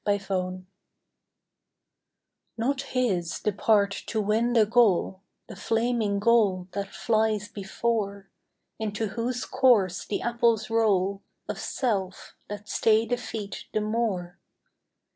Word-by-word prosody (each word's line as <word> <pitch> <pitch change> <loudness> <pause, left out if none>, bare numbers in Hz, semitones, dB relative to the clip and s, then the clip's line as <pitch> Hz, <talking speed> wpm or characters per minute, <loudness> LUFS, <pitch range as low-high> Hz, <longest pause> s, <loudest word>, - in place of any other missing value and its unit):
UNQUALIFIED 185 -2 -1 1.9
Not 265 +4 0 0.2
his 185 -10 0
the 210 - 0
part 200 0 +3 0.2
to 220 - -1
win 220 +3 +1
the 225 -3 +5
goal, 205 -4 +2 0.3
The - - -9
flaming 225 0 0
goal 200 -4 +3
that 200 0 -3
flies 215 -1 0
before, 200 -1 -3 0.5
Into 215 0 -2
whose 240 +4 -3
course 235 -9 +3
the 210 - -3
apples 235 -2 +1
roll 200 -3 +2 0.3
Of - - -4
self 195 -8 -2
that 205 0 -7
stay 220 +1 +3
the 245 +2 -1
feet 220 -4 -6
the 215 - +1
more. 210 -6 -2
215 Hz, 115 wpm, -26 LUFS, 195-230 Hz, 1.9 s, the